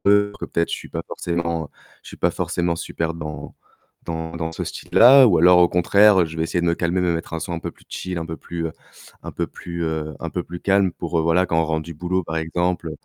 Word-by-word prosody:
que 105 0 +4
peut-être, 85 0 -2
je - - -1
suis - - -10
pas - - -4
forcément 85 -2 -3 0.3
je - - -13
suis - - -10
pas - - +1
forcément 85 -1 -1
super 80 0 -3
dans 75 -3 -7 0.5
dans 80 0 -5
dans 80 -1 -3
ce - - -5
style-là» 130 +2 +6
ou 90 -7 +4
alors 90 +2 +6
au 90 - +6
contraire, 100 +3 +5
heu, - - +2
je 80 - -9
vais 80 - 0
essayer 85 +1 -1
de 85 - -1
me 85 - +2
calmer, 90 +2 0
me 90 -1 +1
mettre 85 +1 -5
un 80 - -3
son - - -5
un 85 - -2
peu - - -6
plus - - -24
chill, 90 -1 -5
un 80 - -4
peu 80 - -6
plus, 85 0 -5
heu 80 - -5 0.5
un - - -6
peu - - -3
plus, 85 -1 -7
heu, 80 -2 -3
un 85 - -4
peu 90 0 -3
plus 90 0 -8
calme 100 -2 +2
pour, 85 0 -3
heu, - - +2
voilà, 85 +3 +2
quand 80 -1 +1
on 80 - +1
rentre 80 0 -1
du 85 0 -8
boulot, 90 +3 -1
par 80 0 -5
exemple 85 +1 -1
85 Hz, 260 wpm, -22 LUFS, 80-90 Hz, 0.5 s, style-là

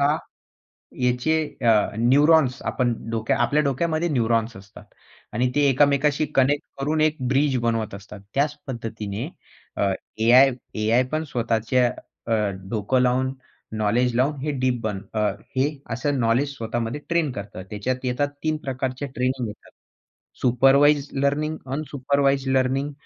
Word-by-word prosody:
हा 145 +2 +3 0.9
याचे 125 +6 +2 0.2
अ, 110 -3 +4
न्यूरॉन्स 140 +2 +4
आपण 125 -2 0 0.2
डोक्या 110 -1 0
आपल्या 150 +1 +2
डोक्यामध्ये 160 +4 0
न्यूरॉन्स 115 -4 0
असतात. 100 +1 -13 0.5
आणि 125 +3 +1
ते 145 - +2
एकामेकांशी 145 +2 +2
कनेक्ट 140 +2 +2 0.2
करून 155 +3 0
एक 155 0 +2
ब्रिज 135 0 +2
बनवत 115 -3 -1
असतात. 100 +1 -10
त्याच 145 +2 +1
पद्धतीने 115 -1 -5 0.5
अ, 100 -1 +1 0.3
एआय 125 +4 +6 0.2
एआय 110 +4 +2
पण 155 +1 0
स्वतःच्या 120 -1 +1 0.4
अ, 115 - -1 0.4
डोकं 115 +3 +1
लावून 130 +1 +1 0.4
नॉलेज 115 +3 +1
लावून 135 +5 +2
हे 150 - -2
डीप 125 -2 +1
बन 105 -3 -2
अ, 110 - 0 0.4
हे 135 +3 +3 0.2
असं 135 +4 -1
नॉलेज 125 +5 +1
स्वतःमध्ये 115 +3 -3
ट्रेन 170 -4 +1
करतात. 100 -3 -7
त्याच्यात 125 +5 -3
येतात 125 +3 0
3 155 -1 0
प्रकारचे 130 +1 -3
ट्रेनिंग 125 -1 -1
येतात. 105 - -12 0.7
Supervised 140 +3 +4
learning, 155 +2 0 0.2
unsupervised 140 -2 0
learning 135 +3 0
130 Hz, 135 wpm, -23 LUFS, 115-145 Hz, 0.9 s, एआय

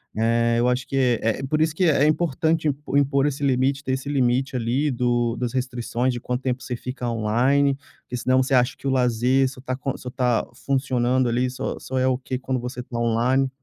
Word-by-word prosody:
eh, 115 +1 +2
eu 120 - +2
acho 125 0 0
que 130 -4 +1
eh, 115 +4 0
por 155 +3 0
isso 155 0 +1
que 185 - +2
é 150 -3 +4
importante 160 +1 +1
im 145 - +2 0.3
impor 140 0 +2
esse 145 0 -3
limite, 135 +1 +1
ter 130 - -1
esse 130 +2 -3
limite 130 -1 +1
ali, 125 +5 0
do 120 -1 0
das 120 -2 -3
restrições 125 -1 -1
de 120 - -4
quanto 125 +1 -3
tempo 130 -1 -2
você 125 - -4
fica 125 +1 -5
online, 125 +5 +2 0.3
porque 125 - -6
senão 130 +2 +2
você 130 +1 -1
acha 125 +1 +2
que - - -6
o - - +2
lazer 125 +1 +2
só 130 - -12
está 130 0 -3
co 135 +1 -4
só 125 - -7
está 125 -2 0 0.2
funcionando 130 -2 +1
ali 125 +2 +1
só 125 - -4
só 130 - -5
é 130 - +2
ok 130 0 -1
quando 130 -1 -2
você 125 +1 -6
está 125 -1 -6
online. 120 +4 +2
130 Hz, 215 wpm, -23 LUFS, 120-135 Hz, 0.3 s, é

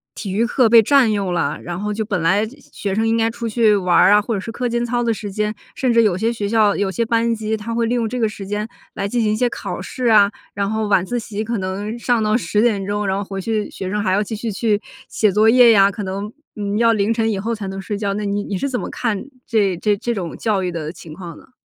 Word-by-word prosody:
体 200 -4 -5
育 225 +4 +2
课 245 0 +3
被 230 0 +7
占 255 -1 +4
用 195 -3 -1
了， 155 -2 -1
然 175 +1 -5
后 210 0 -2
就 220 +1 -2
本 200 -5 -2
来 195 +6 +2 0.3
学 200 -2 -3
生 225 +2 +1
应 225 - +2
该 225 0 +2
出 235 0 -5
去 220 -1 +3
玩 180 -3 +1
儿 195 - +6
啊， 210 0 +6
或 225 +2 -3
者 200 - -1
是 225 - -6
课 245 +1 -2
间 235 0 -1
操 240 0 -1
的 230 -1 +1
时 205 -1 -6
间， 210 +1 -1 0.2
甚 255 -3 +1
至 230 0 +5
有 190 -4 +2
些 230 +4 0
学 205 -3 -3
校 215 -3 +3
有 200 -1 0
些 230 +5 -1
班 230 0 +1
级 220 0 -2
它 225 +2 -5
会 230 0 +1
利 235 - 0
用 230 -2 0
这 250 +1 -3
个 220 - +2
时 200 -2 -7
间 210 +2 -3 0.3
来 200 - -2
进 240 +3 0
行 210 -1 +1
一 - - +1
些 245 +3 +2
考 - - -5
试 255 -1 -5
啊， 205 -3 +6 0.3
然 200 0 -1
后 220 -1 -1
晚 190 -2 +3
自 245 +5 -2
习 215 -1 -5
可 230 0 -2
能 200 +4 -4
上 240 -2 +1
到 215 +1 +1
10 210 -2 0
点 205 -5 +1
钟， 205 +1 -2
然 190 - 0
后 200 - -2
回 195 0 -6
去 215 +1 -2
学 190 -1 -5
生 210 +1 -1
还 185 - +1
要 200 +2 +2
继 215 +1 -4
续 225 +1 -4
去 210 0 0 0.3
写 215 -3 +1
作 215 +3 +4
业 245 -1 +7
呀， 200 -2 +6
可 205 +1 -5
能， 200 +3 -5 0.2
嗯， 205 0 -2
要 230 0 +4
凌 215 +1 +1
晨 225 -1 0
以 195 - -2
后 230 +3 -2
才 205 -2 -6
能 195 0 -5
睡 205 +2 -4
觉。 200 -1 -1
那 210 - -3
你 205 0 -1
你 195 - -3
是 280 - -1
怎 250 - -1
么 - - -4
看 225 -4 -2 0.2
这 200 -6 +1
这 205 +2 +1
这 235 +4 -2
种 180 -6 -5
教 210 -4 0
育 180 - -1
的 160 -2 -4
情 160 -3 -12
况 170 -2 -9
呢？ - - -18
210 Hz, 310 characters per minute, -20 LUFS, 200-230 Hz, 0.3 s, 被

